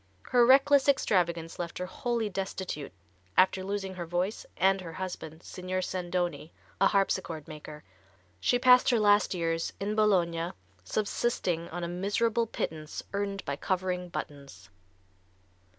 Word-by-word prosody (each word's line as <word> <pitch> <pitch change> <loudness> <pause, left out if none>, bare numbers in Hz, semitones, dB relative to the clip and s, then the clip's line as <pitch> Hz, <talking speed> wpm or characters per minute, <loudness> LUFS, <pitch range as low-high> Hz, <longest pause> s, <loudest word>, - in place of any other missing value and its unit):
Her 245 -1 +5
reckless 275 +1 +6
extravagance 170 -11 +1
left 170 -1 -4
her 180 - -3
wholly 235 +3 -2
destitute 190 -6 -4 0.5
after 190 0 +4
losing 195 -1 -3
her 175 -2 -5
voice 180 +5 -2
and 190 +1 +3
her 165 -2 -8
husband, 165 -3 -6
Signor 185 0 -4
Sandoni, 175 -3 -2 0.3
a 195 - +7
harpsichord 185 -6 0
maker. 150 -1 -9 0.6
She 245 - +2
passed 250 0 +6
her 240 -3 +3
last 205 -2 +4
years 165 -1 -1
in 200 +2 -1
Bologna, 175 -6 +2 0.3
subsisting 180 - -1
on 175 +1 -5
a - - -1
miserable 205 +6 0
pittance 155 -7 -4
earned 200 -1 -2
by 140 - -2
covering 180 0 -2
buttons. 140 -8 -8
185 Hz, 135 wpm, -29 LUFS, 170-205 Hz, 0.6 s, a